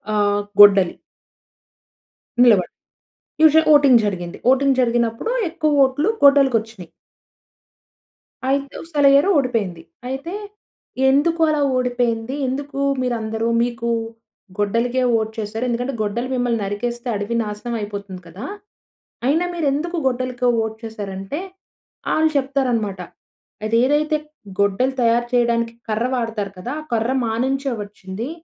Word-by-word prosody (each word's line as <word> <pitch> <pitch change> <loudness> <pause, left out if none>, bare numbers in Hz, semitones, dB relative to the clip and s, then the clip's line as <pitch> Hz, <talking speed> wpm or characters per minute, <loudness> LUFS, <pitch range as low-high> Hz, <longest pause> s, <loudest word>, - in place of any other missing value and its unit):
ఆహ్ 205 0 +2 0.2
గొడ్డలి. 195 -3 +7 1.5
నిలబడ 210 -7 +5 0.7
usual 315 0 +6
voting 280 -5 +6
జరిగింది 175 -3 -4
వోటింగ్ 265 +1 +3
జరిగినప్పుడు 235 - 0 0.2
ఎక్కువ 310 -2 -1
వోట్లు 270 +8 +2
గొడ్డలు‌కొచ్చినాయి. 230 - +3 1.6
అయితే 275 +1 -1
సెలయ్యరు 285 +3 +4
ఓడిపోయింది. 215 -11 -1 0.3
అయితే 270 +7 -5 0.8
ఎందుకు 325 +5 +2
అలా 300 -1 +1 0.2
ఓడిపోయింది, 245 0 -1
ఎందుకు 275 +2 -4 0.2
మీరందరూ 225 -2 -2 0.2
మీకు 235 -1 -3 0.7
గొడ్డలికే 230 +5 0
వోట్ 220 -1 0
చేసారు? 220 +2 -4
ఎందుకంటే 245 +3 -2
గొడ్డలు 215 +4 -2
మిమ్మల్ని 245 -2 0
నరికేస్తే 235 +5 -4
అడవి 205 +3 -3
నాశనం 210 +3 -5
అయిపోతుంది 200 -3 -7
కదా! 185 +9 -9 0.8
అయినా 320 +6 +2
మీరు 335 -3 -2
ఎందుకు 340 +4 -3
గొడ్డలకి 255 0 -1
వోట్ 220 0 -2
చేసారు 215 -3 -6
అంటే 195 +11 -5 0.7
వాళ్ళు 315 0 +3
చెప్తారు 270 -1 0
అన్నమాట. 205 -4 -2 0.7
అది 220 +1 0
ఏదైతే 305 +2 +1 0.4
గొడ్డలు 200 +7 +1
తయారు 235 0 +2
చేయడానికి 235 -1 +1 0.2
కర్ర 220 +3 0
వాడుతారు 225 -5 -3
కదా! 240 +7 -5
ఆ - - -11
కర్ర 230 +3 0
మానించే 265 +4 -1
వచ్చింది. 205 +4 -7
240 Hz, 115 wpm, -20 LUFS, 215-275 Hz, 1.6 s, గొడ్డలి